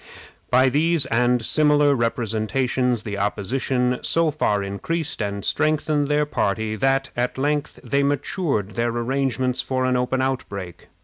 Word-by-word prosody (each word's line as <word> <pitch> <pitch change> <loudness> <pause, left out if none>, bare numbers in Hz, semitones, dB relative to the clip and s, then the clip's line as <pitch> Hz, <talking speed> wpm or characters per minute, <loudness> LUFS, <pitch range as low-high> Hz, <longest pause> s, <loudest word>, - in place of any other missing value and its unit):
By 130 +1 +4
these 155 +2 +2
and 120 -1 +1
similar 150 -1 +4
representations 120 +1 0
the 100 -2 -4
opposition 125 +5 -1
so 165 -1 +1
far 105 -9 0
increased 145 +10 -3
and 100 -1 -3
strengthened 155 -1 +1
their 150 +1 +2
party 110 -5 -1
that, 135 +2 +1
at 125 +1 -1
length, 145 +2 -1
they 140 0 +1
matured 140 - -1
their 115 +4 -1
arrangements 125 +1 -1
for 130 -1 -1
an 130 0 +1
open 125 +1 0
outbreak. 100 -9 -4
130 Hz, 135 wpm, -22 LUFS, 115-145 Hz, -, By